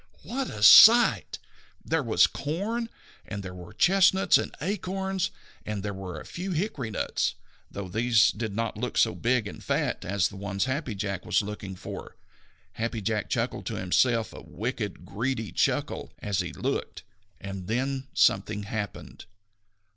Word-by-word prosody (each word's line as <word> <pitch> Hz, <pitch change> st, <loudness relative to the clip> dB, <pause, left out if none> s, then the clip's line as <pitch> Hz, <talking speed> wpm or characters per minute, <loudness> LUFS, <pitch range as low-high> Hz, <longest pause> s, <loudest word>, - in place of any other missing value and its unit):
What 250 Hz, -, -3 dB
a 105 Hz, -, -5 dB
sight! 235 Hz, -, +8 dB, 0.5 s
There 160 Hz, -1 st, +1 dB
was 115 Hz, -5 st, +4 dB
corn! 210 Hz, +10 st, -3 dB, 0.3 s
and 100 Hz, -2 st, -6 dB
there 95 Hz, -1 st, -7 dB
were 90 Hz, -1 st, -10 dB
chestnuts 190 Hz, +1 st, +4 dB
and -, -, -5 dB
acorns! 190 Hz, +2 st, -2 dB, 0.3 s
and 105 Hz, -2 st, -4 dB
there 105 Hz, -1 st, -3 dB
were 95 Hz, -2 st, -6 dB
a -, -, -11 dB
few 185 Hz, +2 st, -5 dB
hickory 155 Hz, -, -2 dB
nuts, 105 Hz, -, -1 dB, 0.3 s
though 100 Hz, -1 st, -6 dB
these 110 Hz, +3 st, +3 dB
did 110 Hz, -2 st, -5 dB
not 115 Hz, -1 st, -2 dB
look 125 Hz, +1 st, -3 dB
so -, -, +4 dB
big 120 Hz, -2 st, 0 dB
and -, -, -9 dB
fat -, -, -1 dB
as 95 Hz, 0 st, +1 dB
the 100 Hz, -, -11 dB
ones 100 Hz, +1 st, -2 dB
Happy 130 Hz, -3 st, -2 dB
Jack 100 Hz, -2 st, -3 dB
was -, -, +1 dB
looking 100 Hz, -2 st, -6 dB
for! -, -, -8 dB, 0.6 s
Happy 115 Hz, 0 st, -3 dB
Jack 105 Hz, 0 st, -2 dB
chuckled -, -, -2 dB
to -, -, -3 dB
himself, 115 Hz, +5 st, +1 dB
a -, -, -9 dB
wicked, 105 Hz, -, -5 dB
greedy 115 Hz, 0 st, -3 dB
chuckle, -, -, -1 dB
as 100 Hz, -2 st, -2 dB
he -, -, -2 dB
looked. -, -, -3 dB, 0.4 s
And 95 Hz, -2 st, -7 dB
then 130 Hz, +3 st, -2 dB
something 105 Hz, +1 st, +2 dB
happened. 100 Hz, 0 st, -6 dB
110 Hz, 155 wpm, -27 LUFS, 100-145 Hz, 0.6 s, sight